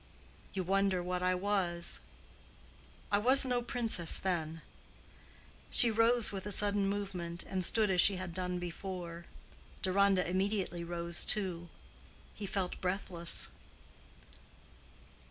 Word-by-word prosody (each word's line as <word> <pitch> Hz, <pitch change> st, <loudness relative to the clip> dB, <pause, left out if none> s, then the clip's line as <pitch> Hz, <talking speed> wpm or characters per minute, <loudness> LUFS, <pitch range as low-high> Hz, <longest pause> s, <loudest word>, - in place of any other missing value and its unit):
You 190 Hz, -, -2 dB
wonder 195 Hz, 0 st, +1 dB
what 180 Hz, 0 st, -3 dB
I 185 Hz, 0 st, +1 dB
was. 180 Hz, -3 st, 0 dB, 1.1 s
I 205 Hz, -, +3 dB
was 260 Hz, +5 st, +6 dB
no 250 Hz, -1 st, 0 dB
princess 230 Hz, -8 st, 0 dB
then." 165 Hz, -3 st, -3 dB, 1.1 s
She 235 Hz, -, +5 dB
rose 230 Hz, +1 st, +3 dB
with 195 Hz, -1 st, -6 dB
a -, -, -3 dB
sudden 205 Hz, 0 st, +3 dB
movement, 180 Hz, -4 st, -5 dB
and 190 Hz, -1 st, -3 dB
stood 215 Hz, +2 st, +2 dB
as 180 Hz, -2 st, +4 dB
she 195 Hz, -, +4 dB
had 185 Hz, -2 st, -6 dB
done 180 Hz, 0 st, -3 dB
before. 175 Hz, -1 st, -7 dB, 0.6 s
Deronda 195 Hz, 0 st, +2 dB
immediately 185 Hz, -1 st, -2 dB
rose 170 Hz, 0 st, 0 dB
too; 180 Hz, -5 st, +1 dB, 0.6 s
he 205 Hz, -, -6 dB
felt 190 Hz, -2 st, -3 dB
breathless. 180 Hz, -2 st, 0 dB
185 Hz, 120 wpm, -32 LUFS, 175-205 Hz, 1.1 s, was